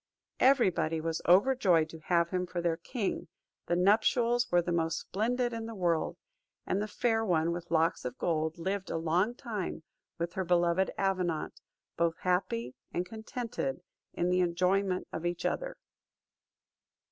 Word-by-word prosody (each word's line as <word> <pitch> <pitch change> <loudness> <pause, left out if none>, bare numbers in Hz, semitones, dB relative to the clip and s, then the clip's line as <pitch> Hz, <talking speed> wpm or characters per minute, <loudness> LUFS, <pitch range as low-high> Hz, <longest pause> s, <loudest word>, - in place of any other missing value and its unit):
Every 255 -6 +5
body 160 -1 -1
was 165 0 -2
overjoyed 185 -4 +5
to 160 - -10
have 170 +1 +1
him 180 -1 -1
for 175 - -4
their 170 -1 0
king: 195 -1 -3 0.4
the 175 - +2
nuptials 230 +6 +3
were 175 0 +4
the 175 - -2
most 165 -1 0
splendid 240 +4 -1
in 225 -1 -4
the 230 - -7
world; 170 -4 0 0.5
and 195 - 0
the 210 - -2
Fair 225 +1 +1
One. 170 -5 +2
with 170 0 -5
Locks 165 +1 +2
of 125 0 -5
Gold 160 -1 -1
lived 190 +3 -3
a - - -1
long 175 +8 +1
time 210 -10 -4 0.3
with 170 0 -3
her 190 - -1
beloved 175 +1 +2
Avenant, 185 -5 -1 0.4
both 165 -1 +1
happy 180 -10 0 0.2
and 175 - -1
contented 220 - -4 0.3
in 175 +1 0
the 180 - +3
enjoyment 185 +2 +1
of 160 - -4
each 175 0 -2
other. - - -2
180 Hz, 160 wpm, -31 LUFS, 170-210 Hz, 0.5 s, Every